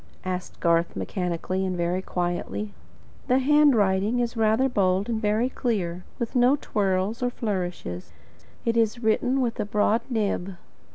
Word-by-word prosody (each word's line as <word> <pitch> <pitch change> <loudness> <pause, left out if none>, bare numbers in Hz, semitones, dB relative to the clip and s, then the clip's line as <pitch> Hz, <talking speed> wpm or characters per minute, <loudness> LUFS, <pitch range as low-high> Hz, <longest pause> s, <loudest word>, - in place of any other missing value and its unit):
asked 180 -1 -4
Garth, 170 0 +2
mechanically 185 0 -2
and 185 -1 -2
very 175 +2 0
quietly. 180 +4 -3 0.5
"The 255 0 +4
handwriting 245 -7 +3
is 240 0 -1
rather 225 +3 +3
bold 195 -5 +1
and 225 -2 -1
very 215 +3 +2
clear, 185 -9 -2
with 235 +2 -4
no 250 +3 +5
twirls 200 -4 -1
or 245 - +1
flourishes. 180 - -4 0.5
It 230 -1 +1
is 230 +1 +1
written 245 +4 +2
with 240 -2 -1
a - - 0
broad 210 +2 +2
nib." 200 -5 -1
210 Hz, 145 wpm, -25 LUFS, 185-235 Hz, 0.5 s, no